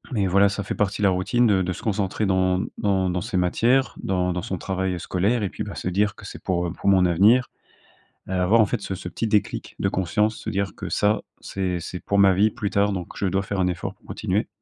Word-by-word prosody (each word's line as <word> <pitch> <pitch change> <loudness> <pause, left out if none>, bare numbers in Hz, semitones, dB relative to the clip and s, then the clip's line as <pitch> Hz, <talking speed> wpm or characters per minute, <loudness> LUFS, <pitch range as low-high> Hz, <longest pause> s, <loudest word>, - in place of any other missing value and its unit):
et 100 -2 +1
voilà, 100 +2 +4
ça 100 +1 -3
fait - - -4
partie 105 0 -1
de 100 - +4
la - - +4
routine 115 +7 +2
de 100 -3 +3
de 90 0 -1
se - - -9
concentrer 105 0 -1
dans 95 -1 +2 0.2
dans 95 -3 +1
dans 90 0 -1
ces 105 -3 -3
matières, 120 +9 +2
dans 90 -1 0
dans 90 - -2
son 95 +2 -4
travail, 95 0 -2
heu, - - -5
scolaire, 105 +7 0
et 100 - -1
puis, - - -5
bah, - - -7
se - - -5
dire 100 +3 +1
que - - -13
c'est - - -9
pour, 90 -1 0
heu, - - -4
pour 100 - -1
mon 95 -2 +5
avenir. 105 +9 +4 0.8
Heu, - - -2
avoir, 95 +5 +3
en 110 - +6
fait, 110 0 -3
ce 95 - -4
ce 90 -1 -6
petit 115 - -3
déclic 105 -1 -1
de 95 - +1
conscience, 105 +4 0
se - - -5
dire 100 -1 -2
que - - -6
ça, 105 +1 +1 0.2
c'est 90 -2 -3
c'est 90 +2 -6
pour 100 - 0
ma 100 -1 +6
vie 105 +3 +3
plus 105 -3 -3
tard, 100 +1 +2
donc 90 -3 -4
je - - -1
dois 95 +1 +1
faire 95 0 -3
un 90 - +2
effort 90 -2 -3
pour - - -30
continuer. - - -2
95 Hz, 265 wpm, -24 LUFS, 90-105 Hz, 0.8 s, en